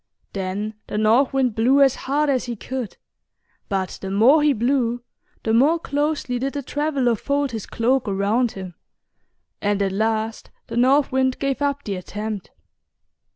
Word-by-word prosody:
Then 200 Hz, +2 st, -3 dB
the -, -, -4 dB
North 225 Hz, +5 st, +3 dB
Wind 265 Hz, -4 st, +1 dB
blew 245 Hz, +6 st, +3 dB
as 275 Hz, -2 st, +6 dB
hard 290 Hz, +3 st, -1 dB
as 265 Hz, -3 st, +1 dB
he 240 Hz, -1 st, -4 dB
could, 255 Hz, 0 st, -5 dB, 0.7 s
but 190 Hz, -2 st, -2 dB
the 190 Hz, -, -4 dB
more 235 Hz, +10 st, +5 dB
he 295 Hz, 0 st, +4 dB
blew 240 Hz, -1 st, 0 dB, 0.4 s
the 220 Hz, -, 0 dB
more 285 Hz, +8 st, +4 dB
closely 290 Hz, -5 st, -1 dB
did 270 Hz, +2 st, -2 dB
the 285 Hz, -1 st, -4 dB
traveler 280 Hz, -3 st, 0 dB
fold 280 Hz, +4 st, -1 dB
his 220 Hz, -3 st, -5 dB
cloak 250 Hz, +2 st, +1 dB
around 205 Hz, +5 st, +1 dB
him; 190 Hz, -2 st, -7 dB, 0.9 s
and 205 Hz, 0 st, +1 dB
at 195 Hz, -1 st, +1 dB
last 220 Hz, +2 st, -1 dB, 0.2 s
the 230 Hz, -, -7 dB
North 265 Hz, +4 st, +3 dB
Wind 260 Hz, 0 st, +1 dB
gave 275 Hz, 0 st, -2 dB
up 285 Hz, 0 st, 0 dB
the 205 Hz, -, -3 dB
attempt. 210 Hz, +2 st, -5 dB
245 Hz, 160 wpm, -22 LUFS, 215-275 Hz, 0.9 s, as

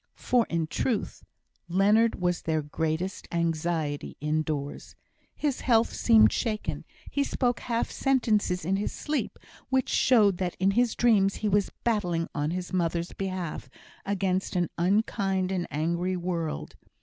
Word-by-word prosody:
For 245 Hz, -2 st, +2 dB
in 165 Hz, -1 st, 0 dB
truth, 210 Hz, +7 st, -2 dB, 0.4 s
Leonard 205 Hz, +6 st, +3 dB
was 180 Hz, -1 st, 0 dB
their 155 Hz, -1 st, -1 dB
greatest 160 Hz, +5 st, -3 dB
anxiety 165 Hz, -3 st, -1 dB
indoors. 150 Hz, -1 st, -3 dB, 0.4 s
His 290 Hz, -4 st, -1 dB
health 230 Hz, -2 st, +3 dB
seemed 225 Hz, -2 st, +5 dB
shaken, 215 Hz, -3 st, -2 dB, 0.3 s
he 285 Hz, -, +1 dB
spoke 245 Hz, -3 st, 0 dB
half 235 Hz, -1 st, -2 dB
sentences 215 Hz, -, +1 dB
in 190 Hz, +3 st, +1 dB
his 205 Hz, -, -2 dB
sleep, 300 Hz, 0 st, -3 dB, 0.3 s
which 260 Hz, -1 st, +1 dB
showed 210 Hz, -7 st, +4 dB
that 180 Hz, -2 st, -2 dB
in 190 Hz, +1 st, +2 dB
his 240 Hz, +2 st, +2 dB
dreams 205 Hz, -5 st, +3 dB
he -, -, +3 dB
was 205 Hz, -1 st, +2 dB
battling 180 Hz, -8 st, 0 dB
on 145 Hz, -1 st, -1 dB
his 180 Hz, +2 st, -4 dB
mother's 170 Hz, -1 st, -1 dB
behalf 185 Hz, -4 st, -4 dB, 0.3 s
against 190 Hz, -1 st, -1 dB
an 175 Hz, -1 st, 0 dB
unkind 190 Hz, 0 st, +1 dB
and 180 Hz, -2 st, -1 dB
angry 170 Hz, +4 st, -1 dB
world. 170 Hz, -3 st, -3 dB
185 Hz, 135 wpm, -27 LUFS, 170-220 Hz, 0.4 s, seemed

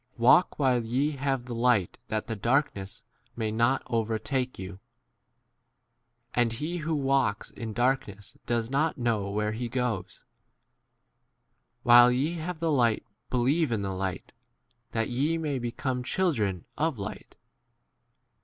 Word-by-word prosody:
Walk 125 Hz, +9 st, +5 dB
while 130 Hz, -4 st, +2 dB
ye 130 Hz, +6 st, 0 dB
have 135 Hz, -3 st, -2 dB
the 125 Hz, -, -6 dB
light 115 Hz, -5 st, +2 dB
that 110 Hz, -1 st, -2 dB
the 115 Hz, -, -4 dB
darkness 110 Hz, -3 st, -1 dB, 0.3 s
may 110 Hz, -2 st, -2 dB
not 120 Hz, +4 st, +2 dB
over 115 Hz, -2 st, 0 dB
take 125 Hz, +4 st, -2 dB
y 95 Hz, -, -6 dB
you. 95 Hz, 0 st, -8 dB, 1.5 s
And 120 Hz, -2 st, +2 dB
he 155 Hz, +9 st, -3 dB
who 160 Hz, -1 st, -2 dB
walks 135 Hz, -6 st, +1 dB
in 115 Hz, -1 st, -6 dB
darkness 120 Hz, -5 st, -1 dB
does 115 Hz, 0 st, 0 dB
not 155 Hz, +4 st, +1 dB
know 115 Hz, -5 st, 0 dB
where 105 Hz, +1 st, -1 dB
he 115 Hz, +3 st, -3 dB
36 120 Hz, -, -7 dB
goes. 110 Hz, -8 st, -2 dB, 1.6 s
While 120 Hz, 0 st, +8 dB
ye 140 Hz, +7 st, 0 dB
have 165 Hz, +1 st, -5 dB
the 165 Hz, -1 st, 0 dB
light 120 Hz, -6 st, +2 dB, 0.2 s
be 125 Hz, -, 0 dB
lieve 140 Hz, +4 st, +2 dB
in 110 Hz, -3 st, 0 dB
the 95 Hz, -1 st, -2 dB
light, 95 Hz, 0 st, -4 dB, 0.6 s
that 115 Hz, -1 st, -1 dB
ye 145 Hz, +7 st, +1 dB
may 150 Hz, -5 st, -2 dB
be 120 Hz, -1 st, -3 dB
come 125 Hz, 0 st, -2 dB
children 115 Hz, -, 0 dB
of 155 Hz, -3 st, +1 dB
light. 100 Hz, -, -7 dB
120 Hz, 150 wpm, -28 LUFS, 110-135 Hz, 1.6 s, While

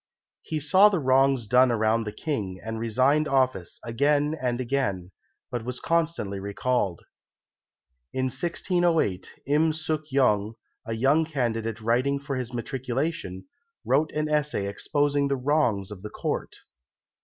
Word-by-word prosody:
He 155 Hz, -, -3 dB
saw 185 Hz, +8 st, +6 dB
the 200 Hz, -, 0 dB
wrongs 135 Hz, -3 st, +3 dB
done 125 Hz, +3 st, +4 dB
around 110 Hz, 0 st, +1 dB
the 105 Hz, -, -4 dB
King, 105 Hz, -, -4 dB
and 110 Hz, 0 st, -4 dB
resigned 130 Hz, +7 st, +2 dB
office 130 Hz, -, 0 dB
again 145 Hz, +5 st, +1 dB
and 125 Hz, -1 st, -1 dB
again, 115 Hz, -9 st, -1 dB, 0.4 s
but 120 Hz, -2 st, -3 dB
was 125 Hz, +1 st, -4 dB
constantly 165 Hz, -, -1 dB
recalled. 100 Hz, -1 st, -1 dB, 1.1 s
In 130 Hz, -, -1 dB
1608 170 Hz, -, 0 dB, 0.2 s
Im 150 Hz, +3 st, +3 dB
Suk 155 Hz, -1 st, -3 dB
yong, 110 Hz, -5 st, +2 dB, 0.3 s
a 115 Hz, -, -2 dB
young 135 Hz, +8 st, +3 dB
candidate 115 Hz, -6 st, -2 dB
writing 125 Hz, +5 st, +1 dB
for 140 Hz, 0 st, -4 dB
his 125 Hz, -2 st, -4 dB
matriculation, 125 Hz, -, -3 dB, 0.4 s
wrote 145 Hz, +5 st, +2 dB
an 155 Hz, 0 st, -1 dB
essay 150 Hz, -8 st, 0 dB
exposing 145 Hz, +7 st, 0 dB
the 140 Hz, 0 st, 0 dB
wrongs 125 Hz, -8 st, +1 dB
of 100 Hz, -3 st, -8 dB
the 105 Hz, -, -6 dB
Court. -, -, -3 dB
130 Hz, 135 wpm, -26 LUFS, 110-150 Hz, 1.1 s, saw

